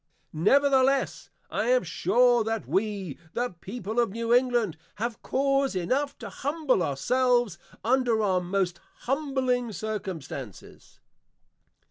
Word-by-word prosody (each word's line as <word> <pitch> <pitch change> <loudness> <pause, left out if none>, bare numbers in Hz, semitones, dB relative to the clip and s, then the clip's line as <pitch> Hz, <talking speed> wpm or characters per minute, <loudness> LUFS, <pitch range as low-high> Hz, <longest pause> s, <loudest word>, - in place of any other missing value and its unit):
Nevertheless, 270 - +3 0.2
I - - 0
am - - +4
sure 245 -1 +3
that 225 0 -3
we, 195 -6 -2
the 245 +1 -1
People 220 +2 -4
of 235 - +3
New 230 +3 -1
England, 240 -8 +2 0.2
have 230 +2 -4
cause 275 -3 +1
enough 260 +11 -1
to - - -7
Humble 290 - 0
our 140 -5 -1
selves 245 - +2 0.2
under 240 -2 +2
our 185 -3 +2
most 180 -1 -1 0.2
Humbling 260 -3 0
Circumstances. 175 - -7
235 Hz, 115 wpm, -27 LUFS, 195-260 Hz, 0.2 s, am